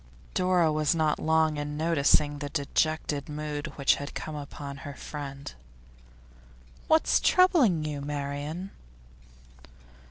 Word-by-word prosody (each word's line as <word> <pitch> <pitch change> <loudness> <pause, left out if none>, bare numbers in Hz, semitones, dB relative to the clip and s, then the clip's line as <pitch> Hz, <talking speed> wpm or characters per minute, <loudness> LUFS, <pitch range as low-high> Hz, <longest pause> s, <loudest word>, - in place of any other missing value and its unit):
Dora 180 -3 +3
was 155 +1 +1
not 155 -2 +1
long 160 -1 +2
in 145 0 -4
noticing 150 -2 +2
the 145 -1 -4
dejected 145 0 -1
mood 150 0 -4
which 140 - +3
had 145 +1 -7
come 155 - -5
upon 140 -1 -7
her 140 +1 -8
friend. 140 - -7 1.3
'What's 315 0 +4
troubling 290 - +4
you, 145 -2 -4
Marian? 145 +5 -4
150 Hz, 115 wpm, -28 LUFS, 145-160 Hz, 1.3 s, What's